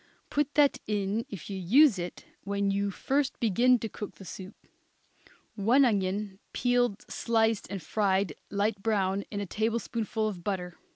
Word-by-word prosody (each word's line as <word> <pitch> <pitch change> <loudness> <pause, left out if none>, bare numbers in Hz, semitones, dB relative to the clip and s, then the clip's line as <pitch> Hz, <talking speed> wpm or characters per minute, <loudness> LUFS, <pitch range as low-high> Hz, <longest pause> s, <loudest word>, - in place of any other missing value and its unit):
Put 295 0 0
that 290 -2 +4
in, 210 +1 -1
if 190 -6 -8
you 195 -2 -4
use 230 - +5
it, 175 0 -6 0.2
when 200 0 0
you 200 +1 0
first 270 +7 -1
begin 240 +3 +4
to 225 - -4
cook 210 -1 -7
the 195 - -12
soup. 190 +3 -8 1.0
One 235 +7 +4
onion, 200 -2 -1
peeled, 245 -4 +1
sliced, 225 -2 +1
and 195 -4 -5
fried 195 -1 +1 0.2
light 200 0 0
brown 200 -2 0
in 205 - -4
a 205 - -2
tablespoonful 220 +1 -1
of 185 -5 -5
butter. 180 -3 -3
205 Hz, 155 wpm, -29 LUFS, 195-230 Hz, 1.0 s, use